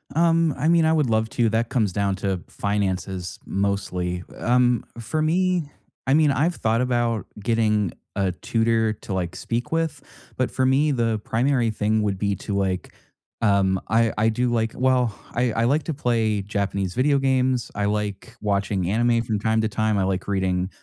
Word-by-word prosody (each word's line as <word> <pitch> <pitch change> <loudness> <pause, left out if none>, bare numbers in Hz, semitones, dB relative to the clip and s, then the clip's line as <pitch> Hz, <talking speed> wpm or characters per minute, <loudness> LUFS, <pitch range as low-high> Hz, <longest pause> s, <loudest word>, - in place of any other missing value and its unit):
Um, 165 -1 +3
I 145 +4 0
mean, 165 -1 +4
I 160 - +3
would 150 -6 +2
love 110 0 +1
to, 120 -2 +2
that 115 +2 0
comes 110 -8 0
down 100 -1 0
to 95 -2 -2
finances 95 -2 -2
mostly. 90 -3 -2
Um, 125 -1 +2 0.2
for 125 +8 -2
me, 175 -1 +1 0.4
I 135 - +4
mean, 150 -1 +4
I've 155 +6 +1
thought 115 +2 +1
about 120 -3 0 0.2
getting 105 -4 +1 0.2
a 95 -2 +1
tutor 115 +4 +1
to, 100 - -7
like, 90 -1 -2
speak 120 +5 -3
with, 165 -2 -1 0.4
but 130 - 0
for 130 - 0
me 140 +4 +3
the 115 -4 0
primary 120 +2 +1
thing 110 0 0
would 100 -2 -1
be 100 0 0
to, 100 - -4
like, 95 -2 -1 0.5
um, 100 -3 +3
I 115 +1 +2
I 110 +1 +3
do, 120 +2 0
like 115 -1 0
well, 125 -4 +1 0.2
I 120 0 +1
I 115 - +1
like 140 +6 +2
to 160 - -3
play 110 -6 0
Japanese 100 -2 -2
video 140 +6 +2
games. 130 -2 +1
I 100 - -1
like 105 -1 -3
watching 100 -3 0
anime 115 +1 +2
from 110 -3 -2
time 110 +1 +1
to 110 - +1
time. 110 -1 0
I 95 - +2
like 95 0 -2
reading 95 -2 0
110 Hz, 180 wpm, -23 LUFS, 100-125 Hz, 0.5 s, mean